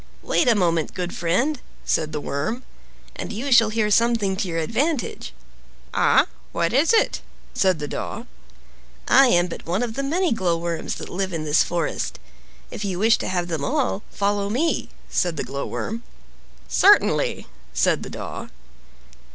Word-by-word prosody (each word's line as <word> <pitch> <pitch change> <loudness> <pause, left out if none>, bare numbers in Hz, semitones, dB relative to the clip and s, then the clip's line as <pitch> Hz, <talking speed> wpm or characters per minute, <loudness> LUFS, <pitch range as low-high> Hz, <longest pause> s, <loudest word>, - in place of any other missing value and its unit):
"Wait 305 - +1
a 235 - +5
moment, 170 -5 +1
good 180 -1 -3
friend," 240 - 0 0.2
said 155 -1 0
the 150 - -3
Worm, 150 - -3 0.5
"and - - -5
you 250 +6 -4
shall 225 -3 +6
hear 215 -1 0
something 230 -3 +3
to 195 0 -2
your 165 -2 -3
advantage." 235 - -1 0.6
"Ah! - - +4 0.3
what 170 +4 0
is 285 +6 +4
it?" 455 - +2 0.3
said 190 -4 +2
the 150 -1 -4
Daw. - - -5 0.8
"I 270 +1 +7
am 175 -7 +4
but 175 - -8
one 185 +7 0
of 235 -2 -3
the 275 - -2
many 335 +6 0
glowworms 170 -4 -1
that - - -7
live 190 0 -3
in 160 -2 -2
this 150 0 +3
forest. 170 -3 -2 0.5
If - - -5
you 190 -3 -2
wish 220 +4 +4
to - - -3
have 175 -2 -1
them 160 -5 -3
all, 95 -8 0
follow 200 0 -1
me," 290 +10 0 0.2
said 175 -4 0
the - - -1
Glowworm. 140 +11 -4 0.7
"Certainly!" - - +4 0.3
said - - +2
the - - -7
Daw. - - -6
195 Hz, 160 wpm, -23 LUFS, 170-235 Hz, 0.8 s, I